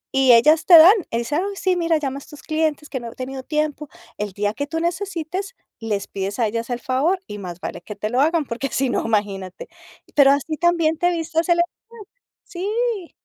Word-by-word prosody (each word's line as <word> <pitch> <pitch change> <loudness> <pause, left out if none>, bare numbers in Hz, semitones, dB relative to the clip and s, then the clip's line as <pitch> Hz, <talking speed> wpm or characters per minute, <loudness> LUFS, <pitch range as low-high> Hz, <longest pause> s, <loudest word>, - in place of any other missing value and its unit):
Y 265 -2 +6
ellas 305 +7 +5
te 345 - +10
dan, 335 +5 +9 0.2
y 230 - -2
dicen: 290 +7 -1
"Ay, 400 +1 -4
sí, 380 -2 0
mira, 335 -2 +1
llama 275 -3 -3
a - - -6
estos 295 +1 -14
clientes 310 -1 -1
que 260 - -4
no 235 -1 -8
he - - -16
tenido 260 +1 -6
tiempo". 300 +1 -2 0.3
El 205 -2 -4
día 205 +1 -1
que 285 +6 -4
tú 325 +2 -3
necesites, 360 +3 -3 0.2
les 210 -3 -3
pides 195 +1 -4
a 235 - +2
ellas 230 +2 -4
el 245 -1 -2
favor, 280 +10 0
y 210 - -8
más 180 -3 -7
vale 175 - -6
que 210 - -9
te 210 +1 -4
lo 250 +2 +2
hagan, 320 +1 +2
porque 245 +2 -3
si 265 0 0
no, - - -1
imagínate. 200 -4 -2 0.5
Pero 280 -2 +6
así 290 +2 -1
también 335 -1 +2
te 350 - +3
vistes 330 -1 -1
el 345 0 +3
estrés, 425 +5 -5 0.4
sí. 415 +1 -3
300 Hz, 215 wpm, -21 LUFS, 235-340 Hz, 0.5 s, te